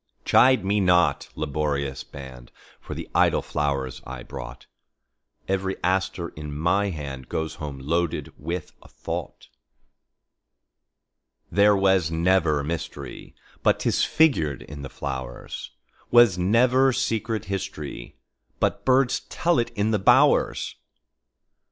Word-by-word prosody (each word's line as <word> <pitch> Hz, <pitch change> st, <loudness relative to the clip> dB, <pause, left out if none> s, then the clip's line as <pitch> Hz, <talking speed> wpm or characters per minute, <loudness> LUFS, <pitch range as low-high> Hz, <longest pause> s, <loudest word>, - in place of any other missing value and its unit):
Chide 130 Hz, -5 st, +5 dB
me 100 Hz, +2 st, +2 dB
not, 90 Hz, -2 st, +3 dB
laborious 70 Hz, -2 st, -2 dB
band, 65 Hz, -3 st, -11 dB, 0.3 s
For -, -, -8 dB
the -, -, -6 dB
idle -, -, +3 dB
flowers 70 Hz, -4 st, -2 dB
I 65 Hz, -1 st, -8 dB
brought; 60 Hz, -3 st, -9 dB, 0.8 s
Every 95 Hz, 0 st, -1 dB
aster 95 Hz, -1 st, 0 dB
in 75 Hz, -1 st, -7 dB
my 100 Hz, +6 st, +1 dB
handGoes 75 Hz, -1 st, -5 dB
home 75 Hz, -3 st, -6 dB
loaded 80 Hz, +5 st, -2 dB
with 85 Hz, +3 st, -5 dB
a -, -, -16 dB
thought. -, -, -6 dB, 2.0 s
There 100 Hz, +1 st, +5 dB
was 95 Hz, -4 st, +3 dB
never 80 Hz, -3 st, +2 dB
mysteryBut 70 Hz, -3 st, -3 dB
'tis -, -, +1 dB
figured 80 Hz, -, +2 dB
in 75 Hz, 0 st, -9 dB
the 70 Hz, -, -7 dB
flowers; 65 Hz, -4 st, -6 dB, 0.4 s
SWas 120 Hz, -5 st, +7 dB
never 125 Hz, +8 st, +4 dB
secret 115 Hz, -4 st, -1 dB
historyBut 95 Hz, -10 st, -5 dB
birds 130 Hz, 0 st, +3 dB
tell 170 Hz, -6 st, +1 dB
it 120 Hz, 0 st, 0 dB
in 105 Hz, +2 st, +1 dB
the 105 Hz, -, +1 dB
bowers. 95 Hz, -, +3 dB
85 Hz, 110 wpm, -25 LUFS, 70-100 Hz, 2.0 s, SWas